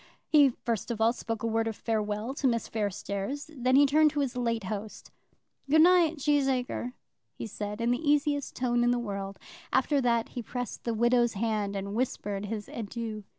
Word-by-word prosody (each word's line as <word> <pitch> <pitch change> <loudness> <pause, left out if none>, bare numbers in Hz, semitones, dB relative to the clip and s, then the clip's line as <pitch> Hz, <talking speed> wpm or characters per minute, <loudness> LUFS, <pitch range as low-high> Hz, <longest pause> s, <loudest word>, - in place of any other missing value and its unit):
He 290 -3 +6
first 230 -3 -3
of 235 -2 -3
all 225 +1 +4
spoke 225 -2 -5
a - - +1
word 225 0 0
of 225 - -3
farewell 215 +2 -2
to 275 -1 0
Miss 230 -2 0
Fairstairs; 205 - -3
then 255 0 +2
he 285 +1 +7
turned 305 +2 +5
to 295 -1 -1
his 265 -3 -2
late 230 -3 -1
host; 210 +2 -6 0.6
"Good 315 +2 +6
night, 345 -3 +5
Cheesacre," 270 -4 0 0.4
he - - -6
said, 210 0 -5
in 235 +1 +1
the 245 - +1
easiest 290 -1 +1
tone 240 -1 +1
in 240 - +3
the 245 - +2
world; 200 -4 -4 0.3
after 270 +2 +2
that 235 -2 +1
he 245 - -5
pressed 245 +1 -6
the 230 -1 -1
widow's 240 +1 +3
hand 210 -1 -1
and 200 +1 -4
whispered 210 -4 -2
his 210 -1 -4
adieu. 220 -1 -5
235 Hz, 190 wpm, -29 LUFS, 215-265 Hz, 0.6 s, he